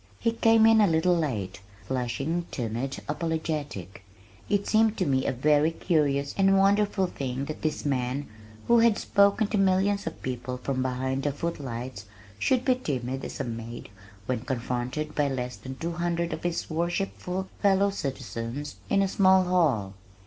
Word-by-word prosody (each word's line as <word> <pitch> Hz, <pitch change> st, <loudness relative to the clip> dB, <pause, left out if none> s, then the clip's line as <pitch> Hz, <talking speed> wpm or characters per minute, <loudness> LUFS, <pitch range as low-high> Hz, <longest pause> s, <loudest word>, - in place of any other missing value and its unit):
He 230 Hz, -, +1 dB
came 225 Hz, -1 st, +4 dB
in 225 Hz, -1 st, +6 dB
a 205 Hz, -, +5 dB
little 165 Hz, +2 st, +3 dB
late, 110 Hz, -, -2 dB, 0.3 s
flushing, 135 Hz, +7 st, -2 dB
timid, 120 Hz, +3 st, -4 dB
apologetic! 150 Hz, -, -3 dB, 0.5 s
It 205 Hz, -1 st, +1 dB
seemed 220 Hz, 0 st, +3 dB
to 185 Hz, -, +1 dB
me 130 Hz, -3 st, +1 dB
a -, -, +2 dB
very 150 Hz, +4 st, +3 dB
curious 145 Hz, -4 st, 0 dB
and 195 Hz, 0 st, +5 dB
wonderful 200 Hz, 0 st, +3 dB
thing 135 Hz, -5 st, -4 dB
that 155 Hz, -, -6 dB
this 155 Hz, -1 st, -2 dB
man 135 Hz, 0 st, -1 dB, 0.4 s
who 235 Hz, 0 st, +6 dB
had 230 Hz, -2 st, +4 dB
spoken 200 Hz, +2 st, +3 dB
to 210 Hz, -, 0 dB
millions 195 Hz, +1 st, +2 dB
of 165 Hz, -, -6 dB
people 125 Hz, 0 st, -4 dB
from 130 Hz, +1 st, -2 dB
behind 130 Hz, +1 st, -1 dB
the 145 Hz, +1 st, 0 dB
footlights 130 Hz, -6 st, -5 dB, 0.3 s
should 255 Hz, -, +1 dB
be 255 Hz, -, +5 dB
timid 135 Hz, -, -3 dB
as -, -, -6 dB
a -, -, 0 dB
maid 115 Hz, -2 st, -6 dB, 0.4 s
when 130 Hz, +1 st, -1 dB
confronted 125 Hz, +4 st, -3 dB
by 145 Hz, -1 st, +1 dB
less 125 Hz, -2 st, -3 dB
than 130 Hz, 0 st, -8 dB
two 165 Hz, +5 st, -3 dB
hundred 170 Hz, 0 st, -1 dB
of -, -, -5 dB
his 175 Hz, -1 st, -2 dB
worshipful 180 Hz, +3 st, -2 dB
fellow 200 Hz, 0 st, +4 dB
citizens 135 Hz, -3 st, -5 dB
in 195 Hz, -, +3 dB
a -, -, +1 dB
small 190 Hz, -1 st, +5 dB
hall. 150 Hz, -, +1 dB
150 Hz, 165 wpm, -27 LUFS, 130-190 Hz, 0.5 s, in